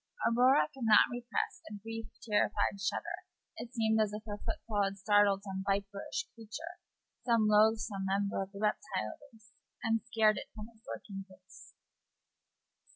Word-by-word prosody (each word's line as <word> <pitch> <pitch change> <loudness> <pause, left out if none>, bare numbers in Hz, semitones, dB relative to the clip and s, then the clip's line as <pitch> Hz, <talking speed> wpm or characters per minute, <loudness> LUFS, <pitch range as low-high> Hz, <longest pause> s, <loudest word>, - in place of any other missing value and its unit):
Aurora 240 - +5
could 260 -3 -5
not 220 +2 +6
repress 245 0 -3
a 210 - -7
brief 225 +2 -6 0.2
terrified 205 -1 +1
shudder; 200 - -3 0.3
it 235 - -7
seemed 220 -2 +2
as 215 -1 +1
if 210 0 -5
her 205 -1 -5
footfall 210 -3 -2
had 195 0 -2
startled 200 0 +4
some 190 -1 -4
viperish 200 +9 -2
creature, 240 +11 -8 0.4
some 230 -3 +3
loathsome 210 -2 +3
member 200 +1 0
of 195 0 -5
the 200 - -10
reptile 200 - -1 0.2
race, 220 0 -21 0.3
and 225 -1 +2
scared 220 -2 +3
it - - -6
from 215 0 -8
its 220 0 -27
lurking 195 -2 -6
place. 185 0 -16
210 Hz, 155 wpm, -33 LUFS, 200-225 Hz, 0.4 s, not